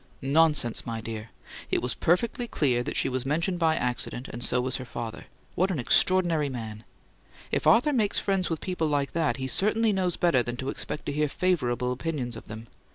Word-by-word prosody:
"Nonsense, 145 -4 +3
my 115 -1 -4
dear! 110 0 -6 0.4
It - - +1
was 125 - -1
perfectly 235 +8 +1
clear 130 - +1
that - - -4
she - - +2
was 130 -1 -2
mentioned 170 +6 0
by 160 -1 +3
accident, 125 0 -2
and 120 +1 -5
so 125 - +3
was 125 0 -1
her 130 - -6
father. 120 -2 -6 0.3
What 185 +2 +1
an 180 - -1
extraordinary 165 +3 +3
man! 110 -4 -6 0.7
If - - 0
Arthur 250 +6 +5
makes 215 -6 +1
friends 195 -2 0
with 165 -2 -2
people 180 -4 -1
like 145 -2 0
that, 160 -3 0
he 130 0 -3
certainly 215 +7 +2
knows 185 -3 0
better 170 -8 +3
than 120 0 -4
to 130 +2 -3
expect 150 - -4
to - - -2
hear 150 +1 0
favourable 125 -9 0
opinions 125 -3 -3
of 110 - -10
them. 110 +2 -8
145 Hz, 200 wpm, -27 LUFS, 125-175 Hz, 0.7 s, Arthur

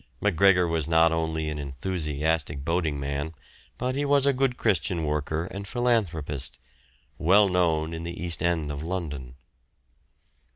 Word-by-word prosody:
Macgregor 95 -1 +4
was 80 -2 0
not 80 0 +4
only 80 -1 -1
an 75 -1 -3
enthusiastic 75 0 -2
boating 80 -3 0
man, 70 +3 -3 0.4
but 130 +1 -1
he 145 - 0
was 140 -1 +4
a 140 - +4
good 130 -1 0
Christian 90 -5 +1
worker 75 +2 -1
and 100 0 -6
philanthropist, 90 - -1 0.6
well 100 +5 +5
known 85 -3 +1
in 80 - -5
the 85 0 -6
East 85 -1 -2
End 85 -4 0
of 70 0 -5
London. 75 -8 -4
80 Hz, 140 wpm, -26 LUFS, 75-95 Hz, 0.6 s, well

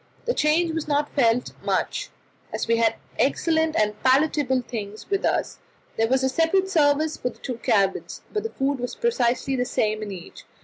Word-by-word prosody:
The 480 - +1
change 320 0 +2
was 320 -2 -3
not 290 0 0
felt 245 -3 +2
much, - - -1 0.4
as - - -3
we 230 0 +3
had 225 -1 +2 0.2
excellent 320 +3 +2
and 210 -1 +2
palatable 265 -1 +2
things 215 -3 -6
with 395 - +1
us. - - 0 0.4
There 225 - +2
was 265 +2 +2
a - - +3
separate 330 +7 +1
service 310 -2 +2
for 250 - -2
the - - -15
two 250 -3 -5
cabins, 195 -4 0
but 425 - 0
the 450 - -4
food 275 - -1
was 245 0 -4
precisely 270 - 0
the 250 - +1
same 215 -3 0
in 210 -1 -5
each. 180 -2 -10
265 Hz, 185 wpm, -24 LUFS, 230-315 Hz, 0.4 s, we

